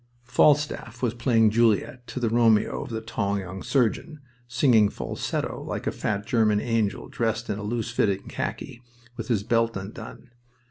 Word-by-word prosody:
Falstaff 130 -1 +1
was 120 -2 +1
playing 115 -2 +3
Juliet 115 +2 +1
to - - -5
the 115 -3 0
Romeo 115 -2 +3
of - - -7
the 110 -1 -4
tall 100 -3 -2
young 95 -1 -6
surgeon, 135 +4 0 0.3
singing 115 -3 +4
falsetto - - -4
like - - -5
a - - 0
fat 100 -1 -2
German 110 -3 +2
angel 115 -3 -1
dressed 115 0 -2
in 105 - -3
loose 115 +3 -3
fitting 100 -4 0
khaki, 120 - -5 0.3
with 115 -3 -6
his 110 -5 0
belt 115 -1 +1
undone. 105 +5 -9
115 Hz, 155 wpm, -25 LUFS, 105-120 Hz, 0.3 s, singing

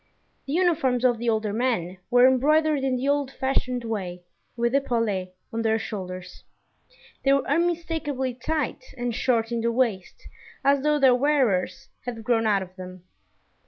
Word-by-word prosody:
The 275 - -3
uniforms 310 -8 +2
of 240 -2 +3
the 235 0 0
older 215 -2 0
men 210 -7 -1
were 245 +1 +6
embroidered 300 +4 +3
in 265 -1 +1
the 255 +2 -2
old 285 -1 +1
fashioned 255 -2 -1
way 185 -6 -4 0.3
with 235 +1 0
epaulets 230 -9 0 0.2
on 230 - -1
their 220 0 +2
shoulders; 185 -4 -7 0.8
they 275 - +3
were 275 - +1
unmistakably 315 -4 -1
tight 300 - -3
and 245 -1 -2
short 230 -1 0
in 235 -1 -1
the 235 +1 +1
waist, 230 -6 -1 0.4
as 280 0 +3
though 300 +1 +2
their 265 -3 +5
wearers 250 -8 +1 0.2
had 235 -2 -5
grown 225 -1 +2
out 200 -2 +2
of 185 0 -14
them. 185 -1 -9
245 Hz, 160 wpm, -25 LUFS, 220-275 Hz, 0.8 s, were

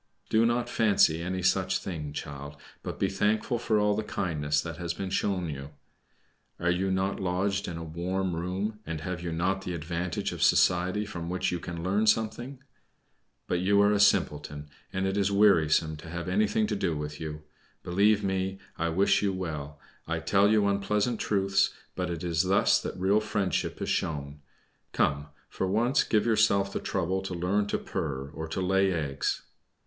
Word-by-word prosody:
Do 115 +1 +4
not 120 +1 0
fancy 100 -9 +3
any 90 +1 -3
such 95 +1 +2
thing, 75 -6 -5
child; 70 -1 -7 0.3
but - - -6
be - - +1
thankful 105 +4 0
for 110 -2 +1
all 105 0 +3
the 110 - 0
kindness 75 -8 -1
that 85 0 -6
has 85 -1 -3
been 95 -1 -4
shown 95 -3 0
you. 70 -2 -6 0.9
Are 90 +1 +2
you 95 +2 0
not 95 +1 0
lodged 95 +2 -1
in 85 - -5
a 85 - -5
warm 90 +3 -2
room, 95 +5 -3
and 80 -4 -5
have 90 +1 -4
you 85 -1 -3
not 95 +4 0
the 90 -2 -4
advantage 85 +2 -3
of - - -6
society 90 +4 +3
from 85 -5 -6
which 90 +1 -1
you 90 - -2
can 85 -1 -6
learn 100 +4 +1
something? 115 +5 +1 0.9
But 90 - 0
you 100 +3 +3
are 100 - +4
a 105 - +2
simpleton, 75 -6 +1 0.2
and 95 +1 -1
it 95 +1 -1
is 100 0 +2
wearisome 80 -6 +4
to 80 - -11
have 85 +1 -5
anything 105 +3 +2
to 105 - -1
do 90 -6 -1
with 75 0 -5
you. 75 -1 -6 0.4
Believe 100 +4 +3
me, 95 0 -1 0.2
I 85 0 +1
wish 95 +5 +3
you 100 -1 +1
well. 75 -6 -5 0.3
I - - -1
tell 100 +1 +3
you 105 -1 +4
unpleasant 105 +3 0
truths, 95 -1 +1 0.2
but - - -2
it 85 0 -4
is 85 -2 +1
thus 95 +2 +3
that - - -5
real 95 +3 +3
friendship 105 -3 -1
is - - -3
shown. 75 -2 -2 0.5
Come, 70 +1 +1 0.2
for 95 - -3
once 120 +8 +2
give 105 -2 +1
yourself 105 -3 +3
the - - -1
trouble 95 +3 -1
to 95 -1 -5
learn 95 +4 0
to - - 0
purr, 70 -3 -4
or 80 0 -6
to 85 +4 -3
lay 95 +1 +2
eggs." 75 -5 -2
95 Hz, 185 wpm, -28 LUFS, 85-100 Hz, 0.9 s, Do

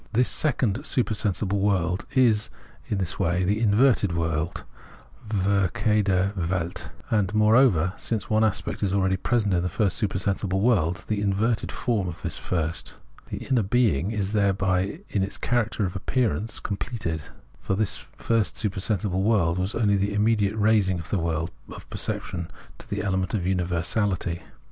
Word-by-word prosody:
This 125 +3 +3
second 125 -8 0
supersensible 105 -4 0
world 95 -2 0
is 115 -4 +4 0.4
in 110 -5 -1
this 95 -1 -2
way 90 +2 +1
the 105 +4 +1
inverted 110 -3 +3
world 80 0 -2 0.7
{verkehrte 100 0 +1
Welt), 90 -2 -3 0.2
and, 105 -3 +2
moreover, 105 -5 +4
since 110 -3 -2
one 110 0 +2
aspect 110 -2 -1
is 100 -2 0
abeady 95 -1 +1
present 110 -5 +1
in 85 - +2
the 90 - -1
first 100 +3 +1
supersensible 95 -1 0
world, 100 -4 +1
the 105 -2 -1
inverted 105 +3 0
form 110 -7 -1
of 85 - -6
this - - -2
first. 85 -2 -1 0.3
The - - -5
inner 125 -3 +2
being 100 - +2
is, 105 -2 -2
thereby, 95 - +1
in 100 - 0
its 95 +1 -3
character 115 -3 0
of 90 0 -4
appearance, 110 +1 -1
com 100 - -3
pleted. 85 -11 -3 0.4
For 95 - -1
the 110 +2 +2
first 115 +2 -2
supersensible 100 -2 -1
world 95 -5 +2
was 95 +3 -2
only 105 -3 +2
the 100 +1 -1
immediate 105 -1 +2
raising 105 -3 +3
of 85 0 -8
the 100 - +1
world 80 0 -1 0.2
of - - -10
perception 85 -1 -2 0.2
into - - -13
the - - -3
element 95 0 -1
of 95 - -1
universahty. 90 0 0
100 Hz, 155 wpm, -25 LUFS, 90-110 Hz, 0.7 s, is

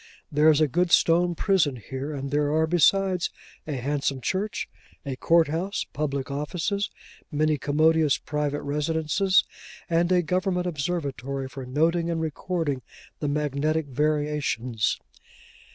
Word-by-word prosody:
There 150 +2 +5
is 155 -1 +5
a 155 - +4
good 175 +6 +1
stone 170 +1 +4
prison 170 -8 +2
here; 130 +5 -6
and 140 -2 -5
there 145 0 +1
are, 160 +1 +3
besides, 180 +2 +3 0.4
a 150 - -2
handsome 140 +1 -1
church, 190 - -2 0.4
a 135 -2 -3
court 165 +4 +3
house, 175 +7 -2
public 140 -2 -2
offices, 180 +8 -2 0.4
many 155 0 +1
commodious 155 +1 +3
private 150 -1 -2
residences, 160 +6 +2 0.5
and 170 +2 +2
a 180 -1 +4
government 180 +1 0
observatory 140 -5 -3
for 130 -1 -8
noting 165 +5 +1
and 165 -1 -1
recording 160 -3 -2 0.4
the 150 - -2
magnetic 150 +2 0
variations. 145 -5 0
150 Hz, 130 wpm, -26 LUFS, 140-170 Hz, 0.5 s, There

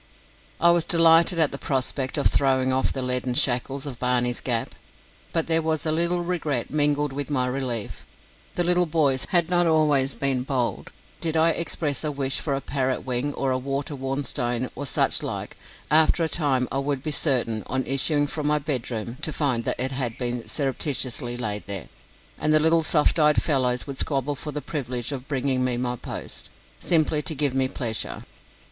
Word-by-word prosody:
I 170 +1 +5
was 170 -1 +2
delighted 165 0 +5
at 160 -3 +3
the 140 - -5
prospect 130 0 -1
of 145 - 0
throwing 130 -1 +3
off 130 0 +1
the 130 - -3
leaden 125 0 0
shackles 135 +2 0
of 130 -4 -7
Barney's 125 -1 0
Gap, 120 -3 -1 0.6
but 165 -2 +1
there 165 0 +2
was 160 -1 -1
a 155 - +2
little 170 +2 +1
regret 155 -8 -2
mingled 145 -1 +1
with 145 +1 -4
my 130 -4 +1
relief. 125 -4 -3 0.5
The 175 - +1
little 180 0 +2
boys 145 -5 +1
had 175 -1 +2
not 175 0 +3
been 165 - +3
always 145 -4 +2
bold. 130 -2 -1 0.3
Did 160 -1 -1
I 165 +1 +4
express 160 -3 -2
a 150 - -1
wish 135 -1 0
for 140 -3 -1
a 135 - -3
parrot 130 -2 -2
wing 130 +3 -1
or 135 -1 0
water 140 +2 -3
worn 135 +1 -3
stone, 125 -2 -1
or 145 +2 -5
such - - +2
like, - - -5 0.4
after 160 +2 +5
a - - +1
time 140 -6 0
I 135 - -1
would 140 -1 -2
be 155 - -2
certain, 125 -7 +2
on 130 0 -1
issuing 145 +3 +2
from 150 0 -3
my 150 0 +3
bedroom, 125 -5 -2
to 155 - 0
find 135 -6 0
that - - 0
it 130 +2 0
had 130 -4 -3
been 120 -1 -3
surreptitiously 130 -4 -1
laid 105 -4 -4
there, 100 -3 -4 0.5
and 155 - +1
the 155 - +5
little 165 +2 +4
soft 155 0 +3
eyed 150 -1 +5
fellows 125 -4 +1
would 140 -2 -6
squabble 140 0 0
for 150 +2 -5
the 150 0 -4
privilege 125 -4 -4
of 135 -2 -6
bringing 130 -2 0
me 125 -1 0
my 125 0 -1
post, - - -7 0.3
simply 155 -3 +2
to 155 - -4
give 145 -2 0
me 130 0 +1
pleasure. 115 -4 -4
140 Hz, 190 wpm, -24 LUFS, 125-155 Hz, 0.6 s, I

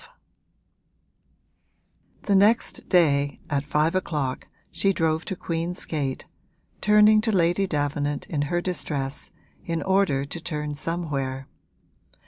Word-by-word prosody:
XII - - -16 2.2
The 200 - +2
next 210 +4 +2
day, 145 -6 +3
at 140 -1 +1
five 150 +2 +1
o'clock, 150 -8 -2 0.2
she 195 0 +1
drove 160 -2 0
to 190 - -3
Queen's 170 +1 -3
Gate, 140 -4 -3 0.6
turning 210 +1 +6
to 220 0 0
Lady 180 +1 +2
Davenant 145 -2 -1
in 150 -3 -2
her 175 0 0
distress 145 -5 -3 0.3
in 165 -1 -2
order 190 -8 +2
to 160 +5 -6
turn 150 -3 -3
somewhere. 140 -4 -3
160 Hz, 115 wpm, -25 LUFS, 145-185 Hz, 2.2 s, turning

